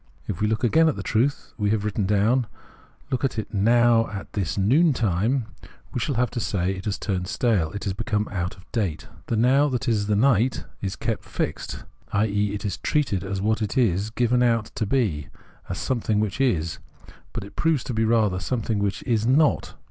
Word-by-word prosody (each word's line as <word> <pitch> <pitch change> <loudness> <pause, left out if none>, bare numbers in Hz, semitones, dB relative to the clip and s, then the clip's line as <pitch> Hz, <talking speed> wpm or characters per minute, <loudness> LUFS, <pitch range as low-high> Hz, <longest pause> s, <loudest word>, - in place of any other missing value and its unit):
If 95 -3 -4
we 105 - +3
look 110 +1 -1
again 160 +7 +4
at 150 - -1
the - - -5
truth 125 +6 0
we 105 -1 +1
have 105 -1 0
written 105 -2 -1
down, 110 +5 +2 0.6
look 130 - -1
at 135 -3 0
it 110 0 -4
noiv, 115 +2 +4
at 100 -3 -7
this 95 -3 -2
noon 140 - +4
time, 115 +3 +1 0.5
we - - -1
shall 135 +4 -1
have 125 +1 +1
to 120 - -3
say 95 -4 0
it 95 0 -6
has 105 -2 -1
turned 90 -4 -2
stale 100 -8 +1
and 100 +1 -4
become 105 -2 -1
out 90 -2 -3
of 95 - -17
date. 95 -9 -2 0.2
The 115 - 0
Now 135 +6 +4
that 125 -3 -2
is 105 -3 +1
night 120 +3 +2 0.2
is 95 0 -3
kept - - -3
fixed, - - -4 0.3
i.e. 105 0 +1
it 105 - -6
is 100 - -2
treated 130 -11 0
as 95 0 -3
what 110 +1 +1
it 105 +5 -2
is 105 -4 +2
given 120 +2 +1
out 115 -3 +2
to 110 - -2
be, 100 - 0 0.4
as - - -3
something 110 -4 0
which 105 +4 -1
is; 85 -11 0 0.5
but - - -5
it 100 - -12
proves 160 -6 +1
to 125 - -4
be 110 0 +1
rather 110 -4 +2
a - - -5
something 115 -2 -1
which 100 -1 -1
is 115 -3 +1
not. 145 +4 +2
110 Hz, 205 wpm, -24 LUFS, 100-125 Hz, 0.6 s, again